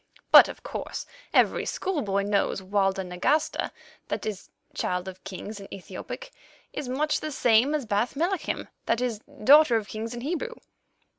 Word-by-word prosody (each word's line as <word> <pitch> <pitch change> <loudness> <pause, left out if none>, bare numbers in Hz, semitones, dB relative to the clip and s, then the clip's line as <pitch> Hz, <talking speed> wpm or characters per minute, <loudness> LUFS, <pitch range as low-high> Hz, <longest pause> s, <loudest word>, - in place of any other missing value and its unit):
But, - - +10
of - - -9
course, - - -5 0.3
as - - +7
every - - -2
schoolboy 235 - -1
knows, 200 -1 +1
Walda 195 0 +1
Nagasta—that 180 - -2
is, 210 -3 -5 0.2
Child 180 +1 -2
of 190 0 -9
Kings 205 +2 -7
in 195 - -11
Ethiopic—is 290 - -9
much 300 +4 +1
the 310 - -4
same 250 +2 +4
as 290 -5 -2
Bath 215 +4 0
Melachim—that 340 -6 -2
is, 245 -4 -1 0.2
Daughter 285 0 +7
of 215 -3 0
Kings 225 +2 -5
in 240 - -6
Hebrew." 355 - -3
225 Hz, 145 wpm, -27 LUFS, 200-295 Hz, 0.3 s, But